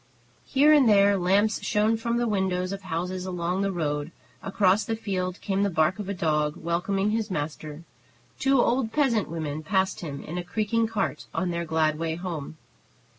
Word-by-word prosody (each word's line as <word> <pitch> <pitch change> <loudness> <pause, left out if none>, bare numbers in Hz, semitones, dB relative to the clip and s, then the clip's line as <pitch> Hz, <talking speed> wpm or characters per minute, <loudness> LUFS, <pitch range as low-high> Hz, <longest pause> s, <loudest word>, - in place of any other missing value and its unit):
Here 290 +3 +5
and 280 -6 +5
there 200 -1 +5
lamps 195 +4 +2
shone 215 +2 +2
from 235 +1 -1
the 240 0 +1
windows 190 -3 0
of 195 0 -5
houses 180 +1 -4
along 180 +1 -2
the 200 0 0
road; 150 -3 -2 0.3
across 195 +1 +2
the 225 - -2
field 185 -4 -3
came 195 0 -1
the 200 - +2
bark 165 +3 +1
of 200 -2 -5
a - - -1
dog, 150 -3 0
welcoming 195 +4 -1
his 220 0 -1
master; 150 -1 -5 0.6
two 270 -1 +3
old 240 -1 +2
peasant 245 -8 +1
women 155 -2 -4
passed 190 +4 0
him 140 -5 -6
in 175 +3 -5
a - - -4
creaking 220 +5 0
cart 215 -3 -3
on 185 -2 0
their 170 0 -2
glad 155 -1 +1
way 165 -1 -1
home. 165 -4 -6
190 Hz, 180 wpm, -26 LUFS, 165-210 Hz, 0.6 s, Here